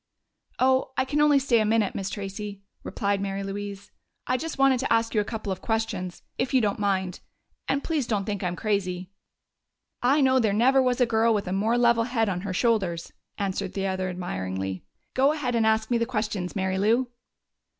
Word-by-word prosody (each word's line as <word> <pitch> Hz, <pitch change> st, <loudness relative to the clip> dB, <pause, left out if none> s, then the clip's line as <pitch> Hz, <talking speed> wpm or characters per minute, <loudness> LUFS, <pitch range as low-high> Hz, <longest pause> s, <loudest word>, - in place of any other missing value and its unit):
"Oh, 260 Hz, +1 st, +2 dB
I 260 Hz, -, +2 dB
can 295 Hz, +3 st, 0 dB
only 295 Hz, -1 st, +5 dB
stay 265 Hz, -4 st, +3 dB
a -, -, +3 dB
minute, 215 Hz, -2 st, +2 dB
Miss 195 Hz, -1 st, -3 dB
Tracey," 200 Hz, 0 st, -6 dB, 0.2 s
replied 200 Hz, -1 st, -1 dB
Mary 195 Hz, 0 st, -3 dB
Louise. 200 Hz, 0 st, -6 dB, 0.3 s
"I -, -, +1 dB
just 315 Hz, +5 st, -4 dB
wanted 270 Hz, -2 st, +4 dB
to 260 Hz, -, -2 dB
ask 230 Hz, 0 st, +2 dB
you 215 Hz, -, +3 dB
a -, -, -1 dB
couple 215 Hz, -2 st, -4 dB
of 190 Hz, -, -4 dB
questions, 220 Hz, -5 st, -2 dB, 0.2 s
if 255 Hz, +2 st, 0 dB
you -, -, +7 dB
don't 210 Hz, -3 st, 0 dB
mind.... 190 Hz, -3 st, 0 dB, 0.5 s
And 275 Hz, +1 st, 0 dB
please 300 Hz, -7 st, -1 dB
don't 205 Hz, -4 st, 0 dB
think 205 Hz, -3 st, -3 dB
I'm 180 Hz, -1 st, -1 dB
crazy." 185 Hz, -3 st, -2 dB, 0.9 s
"I 270 Hz, +5 st, +3 dB
know 260 Hz, -2 st, +4 dB
there 220 Hz, -4 st, +2 dB
never 260 Hz, +5 st, +4 dB
was 250 Hz, 0 st, +1 dB
a -, -, +6 dB
girl 225 Hz, 0 st, +3 dB
with 200 Hz, -3 st, -2 dB
a 185 Hz, -, -1 dB
more 220 Hz, +5 st, +1 dB
level 235 Hz, -1 st, +4 dB
head 225 Hz, -3 st, 0 dB
on 180 Hz, -2 st, -2 dB
her 200 Hz, 0 st, -4 dB
shoulders!" 185 Hz, -5 st, 0 dB, 0.2 s
answered 195 Hz, -1 st, -2 dB
the 195 Hz, -1 st, -2 dB
other 185 Hz, -1 st, -1 dB
admiringly. 95 Hz, -, -4 dB, 0.3 s
"Go 275 Hz, +3 st, +3 dB
ahead 270 Hz, -5 st, -2 dB
and 225 Hz, -2 st, +2 dB
ask 220 Hz, +1 st, +1 dB
me 235 Hz, -, +3 dB
the 230 Hz, -, 0 dB
questions, 215 Hz, -6 st, -2 dB
Mary 190 Hz, -1 st, 0 dB
Lou." 235 Hz, +5 st, +2 dB
215 Hz, 200 wpm, -26 LUFS, 195-245 Hz, 0.9 s, you